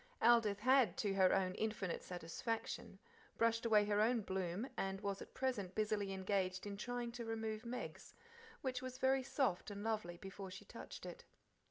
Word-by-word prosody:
Aldith 225 -4 +5
had, 255 0 +5
to 205 -3 +1
her 190 -1 +5
own 185 -1 +2
infinite 210 -4 -1
satisfaction, 180 +6 -3 0.4
brushed 230 0 +3
away 210 -2 +6
her 205 0 +3
own 230 +1 +4
"bloom," 190 +3 -2
and 195 0 -1
was 200 -1 -2
at - - -10
present 225 -8 -1
busily 210 -2 +1
engaged 190 -1 0
in 200 -1 -4
trying 240 +3 -3
to 235 0 -5
remove 225 0 -3
Meg's, 250 +1 -5 0.5
which 255 -1 -1
was 255 0 -5
very 265 0 +3
soft 260 -8 0
and 205 0 -5
lovely 215 -6 -1
before 195 +1 -7
she 190 +1 -9
touched - - -8
it. 485 - -7
215 Hz, 170 wpm, -39 LUFS, 195-235 Hz, 0.5 s, away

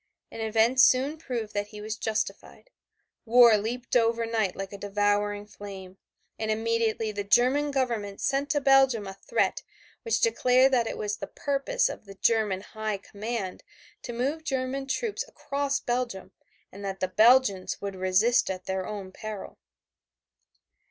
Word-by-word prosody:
And 225 - -7
events 225 +4 +3
soon 275 +5 +3
proved 235 -8 -4
that 205 0 -2
he 210 0 -11
was 215 +1 -4
justified. 220 - -4 0.5
War 235 -1 +7
leaped 235 +5 -3
up 240 - +6
over 230 0 0
night 220 -4 -1
like 195 0 -6
a - - -6
devouring 205 0 0
flame, 195 -2 -10 0.4
and 220 0 -2
immediately 225 0 0
the 205 -1 -4
German 255 +8 +3
Government 235 -8 -2
sent 275 +1 0
to 290 - +2
Belgium 270 -5 +4
a 195 - -6
threat 475 - -1 0.4
which 460 - 0
declared 260 - +3
that 235 -3 +3
it - - -4
was 210 0 -3
the - - -6
purpose 290 - 0
of - - -7
the 195 0 -11
German 210 -3 +1
High 215 0 -4
Command 205 -1 -5 0.4
to 245 - -6
move 275 +7 -2
German 270 -1 -2
troops 445 - -2
across 280 - -2
Belgium, 240 -5 -3 0.4
and 200 +1 -10
that 195 -1 -4
the 185 - 0
Belgians 215 -1 +4
would 200 -1 -5
resist 185 +6 +2
at 185 -1 -5
their 190 -1 -3
own 200 -3 -6
peril. 215 0 -8
225 Hz, 160 wpm, -27 LUFS, 205-260 Hz, 0.5 s, War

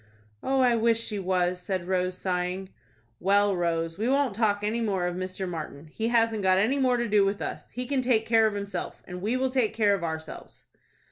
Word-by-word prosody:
"Oh, 270 0 +1
I 245 -2 +4
wish 230 0 +2
she 215 -3 -3
was," 180 -1 0
said 185 -1 -3
Rose, 185 -1 0
sighing. 185 +1 -2 0.5
"Well, 200 +1 +3
Rose, 165 0 -1
we 225 +3 0
won't 275 -4 +2
talk 205 -1 +1
any 220 +3 0
more 195 -5 0
of 175 0 -2
Mr. 185 +1 -4
Martin. 155 -3 -6
He 225 - -2
hasn't 230 -2 +2
got 185 -1 +3
any 235 +8 +2
more 255 -2 +3
to 235 0 -1
do 210 -1 +4
with 195 +1 0
us. - - -5
He 250 +1 -5
can 270 0 0
take 240 -3 +2
care 225 -1 +4
of 210 - -3
himself, 200 -3 -5
and 180 0 -7
we 225 +6 0
will 260 0 0
take 255 -5 +1
care 210 -3 +3
of 195 -3 -2
ourselves." 160 -1 -6
205 Hz, 215 wpm, -27 LUFS, 180-230 Hz, 0.5 s, I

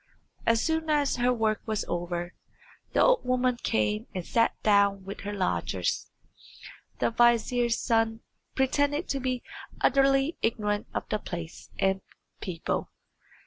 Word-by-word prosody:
As 230 -1 +4
soon 320 0 0
as 290 -3 +2
her 245 +1 +3
work 220 -3 +1
was 215 -1 -1
over 175 0 -3 0.6
the - - +4
old - - +4
woman 250 0 +1
came 105 -1 0
and 180 -2 -3
sat 230 0 +2
down 200 -2 +3
with 195 - -7
her 205 - -5
lodgers. 195 -3 -1 0.9
The - - +1
vizier's 240 0 +3
son 225 -1 +1 0.3
pretended 285 +4 +1
to 275 - 0
be 255 -1 -2 0.4
utterly 275 +3 +3
ignorant 210 -2 0
of - - -2
the 215 - 0
place 170 -4 -7
and 195 -1 +1 0.4
people. 175 -4 -3
225 Hz, 135 wpm, -28 LUFS, 200-255 Hz, 0.9 s, As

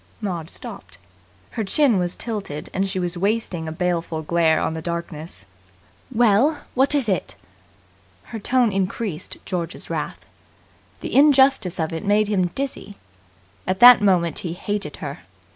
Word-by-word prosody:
Maud 175 -6 -4
stopped. 95 -1 -9 0.5
Her 220 - -3
chin 235 +1 +2
was 175 0 -2
tilted, 195 -10 -5
and 195 +1 0
she 190 - -3
was 175 -1 -2
wasting 195 -5 -1
a - - -4
baleful 170 -2 -2
glare 160 0 +2
on - - -1
the 160 - -5
darkness. 170 -1 -6 0.7
"Well, 240 +6 +3
what 270 +3 +3
is 275 -5 +1
it?" 195 - -1 0.9
Her 225 - -7
tone 245 +1 +2
increased 195 -2 -3
George's 175 -3 -5
wrath. - - -4 0.8
The - - -5
injustice 270 - +4
of 160 0 -1
it 165 - -4
made 205 +1 +2
him 185 -4 +1
dizzy. 260 -1 -5 0.7
At 185 +1 -1
that 245 -2 +10
moment 180 -5 +2
he 170 -2 -4
hated 205 +3 -4
her. - - -6
190 Hz, 145 wpm, -22 LUFS, 170-225 Hz, 0.9 s, that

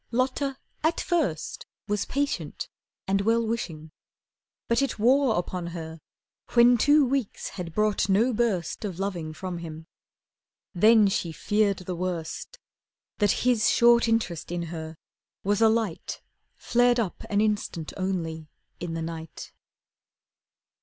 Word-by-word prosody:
Lotta 260 +3 0 0.3
at 320 +2 +2
first 300 - -1 0.2
Was 210 -1 0
patient 285 +1 -2 0.4
and 195 +1 +2
well 230 +2 +2
wishing. 160 -9 -4 0.8
But 235 +3 +2
it 275 - -1
wore 250 +2 +4
Upon 175 0 -3
her 165 -1 -7 0.5
when 240 0 +6
two 290 +3 +5
weeks 260 -4 -2
had 175 -3 -6
brought 210 -1 +1
no 225 +6 +3
burst 210 -8 -1
Of 190 -5 -4
loving 180 -5 -3
from 175 +2 -5
him. 160 -1 -8 0.9
Then 215 +3 +6
she 180 -3 -1
feared 205 +5 +1
the 180 - -3
worst; 175 - -4 0.6
That 205 +2 +2
his 235 -2 +4
short 235 0 +5
interest 220 -9 -1
in 175 -1 -2
her 160 -1 -6 0.5
was 205 +2 +1
a 225 - +7
light 220 -6 -2 0.3
Flared 245 0 +2
up 205 -6 -2
an 205 - +1
instant 210 -6 -1
only 165 -5 -3 0.3
in 165 -2 -4
the 165 - -3
night. 160 -1 -7
205 Hz, 135 wpm, -26 LUFS, 170-235 Hz, 0.9 s, a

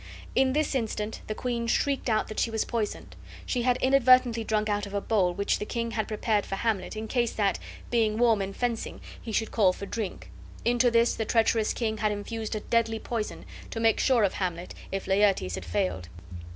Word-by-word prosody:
In 260 0 +3
this 305 +1 +1
instant 220 -4 -2
the 215 - -3
queen 235 -1 -2
shrieked 275 +2 0
out 215 -1 +1
that 215 - -5
she - - +1
was 220 -1 -1
poisoned. 225 -3 -3 0.3
She 250 - -1
had 250 0 +2
inadvertently 255 -3 +5
drunk 215 -1 0
out 205 -1 -1
of 200 - -7
a - - +2
bowl 195 -4 +1
which 200 0 0
the - - -3
king 230 +1 -3
had 220 -2 -2
prepared 215 -1 0
for 195 - -4
Hamlet, 215 -1 -1
in 220 +1 -4
case 240 -1 0
that, 200 -2 +1 0.3
being 220 -3 +2
warm 230 -3 +4
in 195 0 -3
fencing, 235 +1 -3 0.2
he 225 - -6
should 220 +1 -1
call 195 -5 +4
for 200 - -7
drink; 200 - -5 0.3
into 245 +1 +4
this 235 0 +3
the 225 - -2
treacherous 225 0 +2
king 220 -2 -2
had 215 0 +1
infused 220 +2 -4
a 215 - -3
deadly 230 0 +1
poison, 220 -1 -4 0.2
to 225 - -5
make 225 -1 +3
sure 250 -5 +3
of 195 - +2
Hamlet, 180 -2 -3 0.2
if 195 0 -3
Laertes 195 - +2
had 90 0 -5
failed. 90 +1 -2
220 Hz, 205 wpm, -27 LUFS, 205-235 Hz, 0.3 s, inadvertently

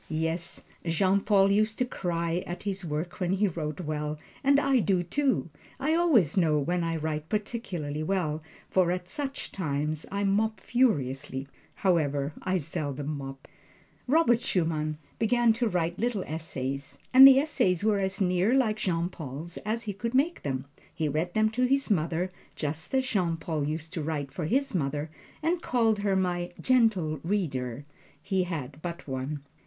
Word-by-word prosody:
Yes, 160 +2 -2 0.2
Jean 185 +4 +2
Paul 200 -1 +4
used 215 +2 +2
to 250 - +2
cry 170 -5 -2
at 175 - -5
his 195 -2 -2
work 160 +2 -4
when 180 -1 +1
he 200 +2 +2
wrote 155 -3 -4
well, 150 -1 -3 0.3
and 280 +1 +5
I 275 -2 +3
do, 190 -4 +2
too. 260 - 0 0.3
I 295 +4 +1
always 300 - +4
know 160 -5 +3
when 175 +5 0
I 165 0 -1
write 155 -1 -3
particularly 190 -9 -3
well, 155 -3 -1 0.3
for 185 -2 +3
at 180 0 -3
such 280 +5 -5
times 150 -3 -2
I 200 +1 -1
mop 215 +3 +1
furiously. 135 - 0 0.3
However, 150 -6 +1
I 185 0 +1
seldom 150 -2 -3
mop. 135 -1 -8 0.6
Robert 260 -5 +4
Schumann 155 -3 0 0.2
began 235 0 +4
to 235 +1 0
write 175 -2 -1
little 230 -5 0
essays, 140 -3 -4 0.2
and 265 +1 +12
the 270 -1 +8
essays 235 - +2
were 210 -2 +3
as 190 0 -1
near 185 +5 +2
like 225 -5 +2
Jean 175 -5 0
Paul's 160 0 -7
as 225 +3 -2
he 205 -2 -3
could 230 +5 -3
make 310 +6 +2
them. 130 -2 -3 0.3
He 155 - -1
read 160 +5 -2
them 215 0 +3
to 250 +3 +1
his 275 -1 +1
mother, 170 0 0 0.2
just 155 - -3
as 260 0 +2
Jean 180 -9 0
Paul 160 -3 -2
used 160 +2 -4
to 165 - -2
write 145 -3 -3
for 155 +3 -4
his 270 - +1
mother 150 -2 -1 0.3
and 335 +2 +1
call 230 -6 +2
her 200 -1 +1
"my 175 -2 -1
Gentle 215 - +2
Reader" 145 - -2 0.3
he 185 +3 0
had 150 -4 -5
but 170 -2 -6
one. 135 +2 -4
175 Hz, 170 wpm, -28 LUFS, 155-215 Hz, 0.6 s, and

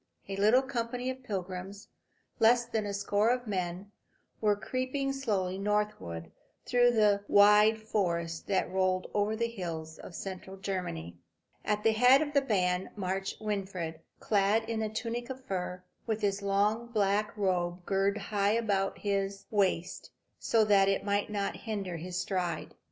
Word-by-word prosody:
A 195 - -4
little 215 +7 +4
company 250 -1 -2
of 260 0 -9
pilgrims, 195 -2 -5 0.5
less 235 +1 +5
than 220 -3 -2
a - - -2
score 205 +2 +1
a 245 -1 0
men, 185 0 -3 0.5
were 210 -2 +3
creeping 255 +5 -2
slowly 195 -9 -1
northward 195 - -2 0.3
through 245 -1 +4
the 210 -3 +3
wide 210 +2 +6
forest 170 -6 -2
that 190 -2 0
rolled 185 0 0
over 210 +1 +1
the 235 +1 0
hills 165 -7 -6
of 170 - -10
central 190 +1 -7
Germany. 135 - -4 0.5
At 210 0 0
the 225 - +5
head 250 +6 +6
of 290 -1 -6
the 280 - +4
band 185 -7 0
marched 195 -1 -3
Winfried, 190 -6 -3 0.2
clad 210 +2 +2
in 225 -1 -2
a 215 - -1
tunic 235 +3 -4
of 260 0 -7
fur, 180 -2 -4 0.2
with 220 -1 -1
his 200 -1 0
long 205 +4 +1
black 210 -2 0
robe 180 -3 -1
girt 195 0 +1
high 205 0 0
about 200 -4 0
his 195 -1 -2
waist, 190 -4 0 0.3
so 225 -2 +3
that 200 -2 +5
it 195 - 0
might 205 0 0
not 205 -1 -2
hinder 200 -6 -4
his 180 +2 -5
stride. 180 -4 -2
205 Hz, 155 wpm, -30 LUFS, 185-220 Hz, 0.5 s, wide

